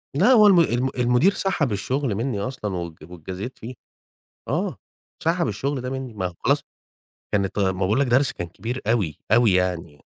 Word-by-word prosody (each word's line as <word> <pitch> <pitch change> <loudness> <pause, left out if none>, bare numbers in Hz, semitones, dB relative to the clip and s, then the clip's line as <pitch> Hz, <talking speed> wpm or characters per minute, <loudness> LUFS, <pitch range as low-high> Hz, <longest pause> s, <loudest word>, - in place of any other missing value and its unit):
لا، - - +5
هو 215 -5 +7
الم 190 -4 +6
الم 130 -5 +2
المدير 125 +10 +3
سحب 165 - 0
الشغل 125 +4 -1
مني 115 -1 -2
أصلًا 105 -3 -4
وات 85 -2 -4
واتجازيت 90 +8 -7
فيه. 120 +3 -8 0.7
آه، - - -1 0.5
سحب 170 0 +1
الشغل 130 +6 -2
ده 125 - -4
مني، 130 -2 -5
ما 100 -4 -3
هو 90 - -9
خلاص - - +4 0.7
كانت 100 0 0
غ - - +3
ما 95 - -8
باقول 100 +7 +2
لك 140 - +2
درس 130 +3 +3
كان 85 - -6
كبير 120 +8 -5
أوي، 100 -10 0
أوي 115 -2 +5
يعني. 90 -5 -1
120 Hz, 185 wpm, -23 LUFS, 95-135 Hz, 0.7 s, هو